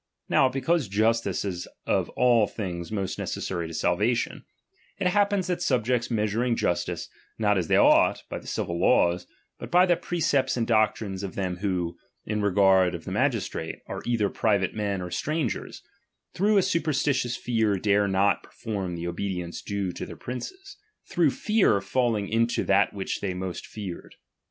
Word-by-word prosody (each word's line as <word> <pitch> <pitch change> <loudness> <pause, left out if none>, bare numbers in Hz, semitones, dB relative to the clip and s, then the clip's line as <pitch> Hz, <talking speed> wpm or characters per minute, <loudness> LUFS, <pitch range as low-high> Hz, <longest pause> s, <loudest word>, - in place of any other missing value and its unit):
Now, 130 - +4
because 135 +2 0
justice 110 +3 +1
is 90 -3 -4 0.2
of - - +1
all 120 -4 +4
things 90 -5 -5
most 100 -4 -3
neces - - -3
sary 85 -3 -3
to 85 - -8
salvation, 105 +9 0 0.5
it 195 - -3
happens 200 0 +2
that 180 -1 -2
subjects 125 -1 +1
measur 110 0 0
ing 125 -2 +1
justice, 85 - -1 0.3
not 105 -2 +2
as 90 -4 0
they - - +3
ought, - - +5
by - - -5
the - - -15
civil 85 0 -2
laws, 90 0 +3 0.3
bnt - - -6
by 180 +1 +5
the 175 -2 +3
precepts 165 -7 0
and 115 - +1
doctrines 110 -3 +1
of 100 -2 -6
them 90 -2 -2
who, 90 -3 -2 0.3
in 105 0 -1
regard 95 -2 +4
of 80 - -8
the - - -5
magistrate, 80 - -1
are - - -6
either 115 -4 +1
private 100 -2 +1
men 100 -3 -2
or 90 - -6
strangers, 150 - -3 0.5
through 205 +3 +3
a 195 - +5
superstitious 145 -8 0
fear 110 -4 +1
dare 100 +1 +2
not 100 0 +2
per - - -18
form 95 -5 -4
the 85 0 -4
obedience 90 -1 -4
due 100 -2 -2
to - - -7
their - - -9
princes; 375 - -7 0.3
through - - +3
fear 210 - +2
falling 110 -1 0
into 115 +2 +1
that 100 +1 +3
which 100 -2 -4
they 95 -3 -2
most 95 -1 -5
feared. 100 -5 -8
105 Hz, 170 wpm, -26 LUFS, 95-125 Hz, 0.5 s, ought